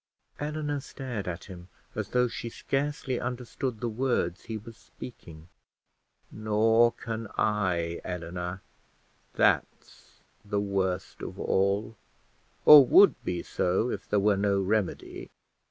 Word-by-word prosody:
Eleanor 150 -1 -2
stared 130 -7 -6
at 90 0 -4
him, 90 -2 -11 0.3
as - - -4
though 125 0 +2
she 120 0 -6
scarcely 135 0 -2
understood 125 -1 -4
the 120 - -2
words 115 -7 -1
he 110 - -4
was 115 +2 -11
speaking. 85 -10 -12 0.8
"Nor 110 +2 +3
can 115 -1 -5
I, 90 -5 0
Eleanor: 90 +1 -5 0.7
that's - - -1 0.2
the 100 0 -1
worst 95 -2 -2
of - - -7
all, 100 +3 0 0.7
or 150 -2 +11
would 190 +4 +5
be 90 -1 -3
so 95 +7 0
if - - -6
there 105 - +2
were 100 0 +3
no 100 0 +2
remedy. 100 0 -2
105 Hz, 120 wpm, -28 LUFS, 95-125 Hz, 0.8 s, or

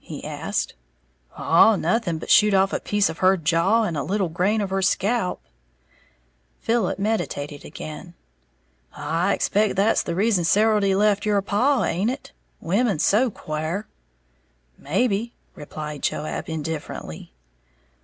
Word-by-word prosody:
he - - -8
asked. - - -3 0.6
"Oh, 210 +7 +5
nothing, 180 -1 0
but - - -4
shoot 210 -2 +6
off 195 0 +2
a - - 0
piece 205 -1 +1
of 160 - -6
her 190 +1 +4
jaw 170 +7 +2
and 175 -7 -2
a 145 - -1
little 190 +2 -1
grain 190 +7 0
of 200 -2 -2
her 195 0 0
scalp." 195 +2 0 1.2
Philip 225 -5 0
meditated 155 - -3
again. 160 +3 -9 0.8
"I 175 +5 0
expect 210 0 +1
that's 205 +4 +3
the 170 - -4
reason 200 -2 +2
Serildy 205 +1 +3
left 205 0 +2
your 210 -1 +2
paw, 250 +8 +2
haint 190 +7 0
it? 265 +2 -6 0.3
Women's 195 0 +1
so 240 +5 +3
quare." 160 +2 -4 0.9
"Maybe," 205 - -1 0.2
replied 150 -1 -7
Joab, 155 - -3
indifferently. 155 - -6
195 Hz, 135 wpm, -23 LUFS, 165-215 Hz, 1.2 s, shoot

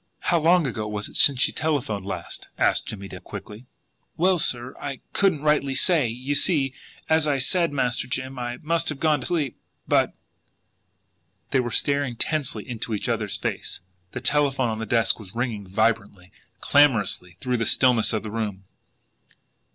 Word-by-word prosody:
"How 170 - +2
long 170 +1 +4
ago 110 -4 -3
was 105 -1 -3
it - - -14
since 135 -3 +5
she - - +4
telephoned 125 -11 -2
last?" 90 -3 -6
asked - - +2
Jimmie 100 -2 -6
Dale - - -9
quickly. 110 +5 -10 0.5
"Well, 185 +1 +3
sir, 125 -3 +1
I 140 -2 -5
couldn't 180 -7 +2
rightly 150 -3 +2
say. 165 -7 +4
You 125 +5 -3
see, 140 -3 +3 0.3
as 160 -1 +2
I 145 -2 +2
said, 170 +6 +1
Master 125 -3 0
Jim, 130 +1 -3
I 120 0 -4
must 165 +1 +1
have 150 -3 -4
gone 155 -2 +2
to - - -3
sleep, 155 -8 -1 0.3
but - - +2 0.7
" 85 +2 -46
They 135 - +3
were 120 -1 -1
staring 140 0 0
tensely 135 -5 -2
into 115 -2 -4
each 105 - -4
other's - - -1
face. - - -4 0.3
The 120 - -5
telephone 135 -2 +2
on 110 0 -3
the 110 - -4
desk 115 +1 +2
was 105 -1 -12
ringing 115 -5 -3
vibrantly, 100 -2 -1 0.3
clamourously, 105 -11 +3
through 125 -1 -1
the 115 -2 -1
stillness 125 -4 +4
of 110 -2 -2
the 110 - -6
room. 105 -4 -4
125 Hz, 175 wpm, -24 LUFS, 110-145 Hz, 0.7 s, since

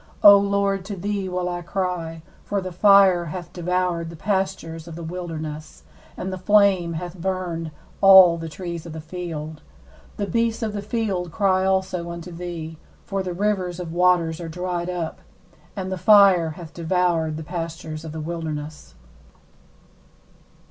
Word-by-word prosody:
19O 200 -1 +8
Lord, 200 -1 0
to 200 0 -5
thee 195 0 -3
will 180 0 -2
I 175 0 -3
cry: 170 -3 -3 0.2
for 205 - -1
the 185 -1 -5
fire 190 -1 +5
hath 175 +2 -7
devoured 180 -1 -1
the 170 - -9
pastures 190 -3 -2
of 165 - -8
the 170 - -7
wilderness, 160 -3 -6 0.3
and 190 +1 -4
the 185 - -5
flame 190 -3 +3
hath 175 +2 -6
burned 175 -3 -2 0.3
all 190 -3 +9
the 165 0 -5
trees 170 0 -6
of 165 - -8
the 160 - -6
field. 160 -2 -6 0.6
20The 200 -3 -3
beasts 230 +1 0
of 215 -2 -2
the 205 - -3
field 200 -5 -2
cry 190 0 +2
also 190 -2 0
unto 170 +1 -7
thee: 165 -2 -6 0.3
for 195 -1 -2
the 185 -1 -4
rivers 185 -2 -1
of 170 -2 -5
waters 175 -2 +2
are 165 - -5
dried 180 +1 -3
up, 175 -3 -4 0.5
and 190 -2 -4
the 190 - -3
fire 195 -5 +6
hath 165 -2 -10
devoured 170 -2 0
the 160 - -6
pastures 165 -1 -6
of 160 - -7
the 160 - -6
wilderness. 155 - -6
180 Hz, 160 wpm, -23 LUFS, 165-190 Hz, 0.6 s, all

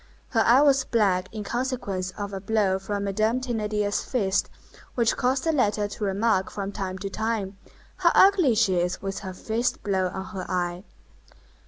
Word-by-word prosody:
Her 230 - +1
eye 250 +4 +6
was 275 -2 +4
black 195 -7 +1
in 215 -1 -5
consequence 235 -6 -2
of 205 -1 -5
a 195 - -4
blow 200 -2 +1
from 200 +1 -3
Madame 215 +5 +1
Thénardier's 210 -4 -1
fist, 200 -7 0 0.5
which 235 -2 +2
caused 260 +1 0
the 325 - +2
latter 210 -7 +1
to 205 +1 -7
remark 195 0 +1
from 200 -1 -5
time 190 -2 -4
to 195 +1 -5
time, 210 -3 -2 0.4
"How - - +4
ugly 370 - +5
she 200 -4 +3
is 180 +1 -1
with 195 0 -3
her 190 -2 -7
fist 230 +5 -2
blow 190 -2 +1
on 190 +1 -5
her 190 -2 -7
eye!" 180 0 -2
205 Hz, 175 wpm, -25 LUFS, 190-235 Hz, 0.5 s, eye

